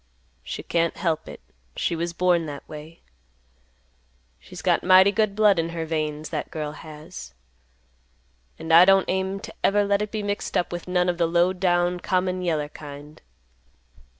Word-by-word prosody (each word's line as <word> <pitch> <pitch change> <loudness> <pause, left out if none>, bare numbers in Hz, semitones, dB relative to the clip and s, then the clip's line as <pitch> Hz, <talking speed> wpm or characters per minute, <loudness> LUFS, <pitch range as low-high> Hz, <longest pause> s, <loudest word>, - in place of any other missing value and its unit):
She - - -6
can't 170 -1 0
help 165 -3 -1
it. - - -10 0.3
She 170 - -1
was 170 +1 -2
born 175 -1 +1
that 145 -1 -8
way. 155 +2 -11 1.4
She's - - -11
got - - +2
mighty 190 +2 +6
good 215 -1 0
blood 210 -4 +4
in 165 0 -1
her 165 -1 -4
veins, 155 -1 -3
that 155 -3 -4
girl 150 -2 -4
has; 155 - -11 1.2
and 160 0 -2
I 170 +2 +10
don't 195 0 +5
aim 190 +1 -1
to - - -9
ever 205 +1 +3
let 200 0 +1
it 210 - -2
be 215 -1 -4
mixed 205 0 -2
up 175 - -1
with 175 0 -6
none 180 0 +1
of 175 -1 -1
the 170 - +3
low 175 +2 +2
down 180 -1 +1
common 185 0 -1
yeller 155 -4 -1
kind." 145 0 -11
175 Hz, 170 wpm, -24 LUFS, 160-185 Hz, 1.4 s, I